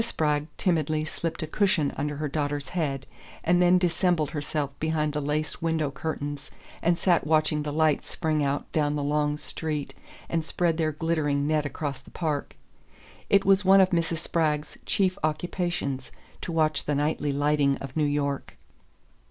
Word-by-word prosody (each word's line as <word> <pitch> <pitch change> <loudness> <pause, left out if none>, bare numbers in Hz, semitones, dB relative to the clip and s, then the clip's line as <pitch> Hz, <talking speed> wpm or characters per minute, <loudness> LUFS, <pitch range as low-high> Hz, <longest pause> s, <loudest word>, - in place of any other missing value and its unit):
Spragg 150 -9 0
timidly 155 -3 +1
slipped 165 +1 -4
a - - -1
cushion 170 -3 +1
under 150 +1 -2
her 150 +1 -2
daughter's 145 -1 -2
head, 140 -6 -2 0.4
and 175 +1 +3
then 180 +1 +6
dissembled 175 -3 +1
herself 145 -1 -2
behind 155 -1 0
the 150 - -1
lace 150 +3 -2
window 160 -3 0
curtains 145 -1 -4 0.3
and 170 0 +2
sat 175 -4 +2
watching 155 -1 +2
the 150 0 -3
lights 155 -1 +2
spring 155 -3 0
out 140 0 0
down 150 -1 +1
the 145 - -1
long 150 0 +1
street 150 -1 -4 0.3
and 165 -1 -1
spread 165 0 0
their 160 -2 +1
glittering 150 -2 0
net 150 -1 +1
across 140 -3 -4
the - - -16
Park. 155 -4 -3 0.7
It 200 0 +4
was 195 +1 +5
one 195 +1 +7
of 190 0 +5
Mrs. 165 -1 +1
Spragg's 155 -2 -1
chief 190 -1 +1
occupations 155 -4 -2 0.3
to 170 - -4
watch 155 -2 +1
the 145 - 0
nightly 150 0 0
lighting 145 -1 +2
of 135 -1 -8
New 155 - +2
York. 145 -1 -2
155 Hz, 165 wpm, -27 LUFS, 145-165 Hz, 0.7 s, one